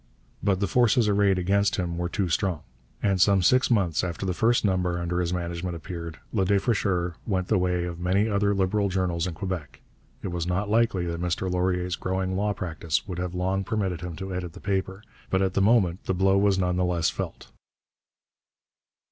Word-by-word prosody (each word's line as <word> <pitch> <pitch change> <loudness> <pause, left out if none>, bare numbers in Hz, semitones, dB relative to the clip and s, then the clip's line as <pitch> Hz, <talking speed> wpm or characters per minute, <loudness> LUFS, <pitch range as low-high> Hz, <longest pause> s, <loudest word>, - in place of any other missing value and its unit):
But 100 -2 +1
the 100 - +1
forces 120 +1 +3
arrayed 100 -2 +3
against 100 +2 +2
him 85 -3 -2
were 85 0 -2
too 95 0 -1
strong, 85 -1 0 0.4
and 95 -3 +2
some 100 -1 +4
six 130 +7 +4
months 95 -9 +2
after 90 +1 -3
the 95 - 0
first 115 +5 +2
number 90 -3 +1
under 85 +1 -1
his 90 -1 0
management 85 0 -3
appeared, 85 -1 -7 0.2
Le 100 -4 +2
Défricheur 95 -3 +1
went 95 -4 -1
the 105 - +3
way 90 -1 0
of 85 -1 -6
many 95 +4 +2
other 100 -1 +1
Liberal 100 +1 +1
journals 90 -2 0
in 85 - -5
Quebec. 90 -4 -5 0.4
It - - -2
was 85 -1 -3
not 100 +3 -1
likely 110 -5 +2
that 85 0 -3
Mr 90 +1 -1
Laurier's 90 0 0
growing 95 +1 -2
law 105 +2 +1
practice 85 -4 -2
would 90 -3 -5
have 90 0 -3
long 95 +2 0
permitted 95 -4 -2
him 90 -2 -5
to 95 +1 -6
edit 90 -2 -4
the - - -11
paper, 95 0 -2 0.3
but 95 0 +2
at 95 -1 0
the 100 - +1
moment 100 -4 +3
the 95 - 0
blow 95 +1 +3
was 100 -1 +3
none 90 -1 0
the 90 - +2
less 90 -2 +1
felt. - - -6
95 Hz, 200 wpm, -26 LUFS, 90-100 Hz, 0.4 s, some